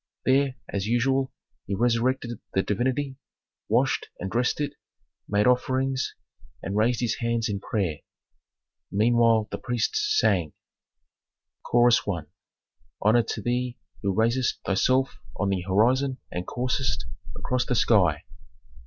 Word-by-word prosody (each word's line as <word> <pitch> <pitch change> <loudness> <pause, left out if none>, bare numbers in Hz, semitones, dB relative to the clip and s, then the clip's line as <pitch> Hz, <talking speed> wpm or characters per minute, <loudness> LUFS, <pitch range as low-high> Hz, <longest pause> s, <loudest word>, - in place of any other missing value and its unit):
There, 135 0 +3
as 100 0 -3
usual, 130 +3 +1 0.4
he 100 - -1
resurrected 120 +1 0 0.2
the 95 - +3
divinity, 130 +5 -1 0.5
washed - - +2
and 95 +1 -4
dressed 120 +4 +1
it, 145 -1 -2 0.6
made 105 0 +2
offerings, 130 +1 +1 0.5
and 95 - -3
raised 115 +3 +2
his 120 +5 0
hands 115 -2 0
in 100 -2 -2
prayer. 95 -8 -2 0.9
Meanwhile 115 +1 +3
the - - -4
priests 420 - 0
sang: 85 - +2 1.1
Chorus 120 0 +4
I. 85 -5 -1 0.8
"Honor 110 +3 +4
to 110 -2 -5
thee 125 0 -1 0.2
who 100 - 0
raisest 115 +5 +1
thyself 130 +7 +1 0.2
on 100 - -1
the 95 -2 0
horizon 125 +9 +2
and 90 0 -4
coursest 125 -3 -1 0.3
across 125 0 -1
the 125 - +1
sky." 95 -9 +3
120 Hz, 125 wpm, -26 LUFS, 100-130 Hz, 1.1 s, Chorus